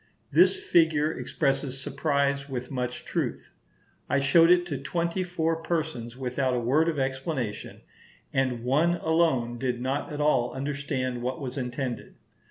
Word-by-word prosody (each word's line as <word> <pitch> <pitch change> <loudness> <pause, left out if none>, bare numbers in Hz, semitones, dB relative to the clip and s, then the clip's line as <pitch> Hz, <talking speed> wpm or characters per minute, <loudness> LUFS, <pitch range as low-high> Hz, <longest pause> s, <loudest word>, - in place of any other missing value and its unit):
This - - +5
figure 160 - +3
expresses 135 -4 -1
surprise 140 0 0
with 125 -1 -5
much 125 -2 -3
truth. - - -3 0.6
I - - +2
showed 165 +4 +5
it 175 0 +5
to 145 -6 -4
twenty 170 +6 -1
four 165 -3 0
persons 155 -8 -3
without 130 0 -1
a - - +1
word 145 +8 +2
of 160 - -2
explanation, 130 -3 -3 0.5
and 130 -3 0
one 155 +7 +3
alone 160 -9 +1
did 125 -1 -1
not 135 +4 -2
at 150 - -5
all 135 -5 +2
understand 135 -3 -2
what 125 +1 -3
was 130 -3 -5
intended. 125 -1 -4
140 Hz, 145 wpm, -27 LUFS, 125-160 Hz, 0.6 s, This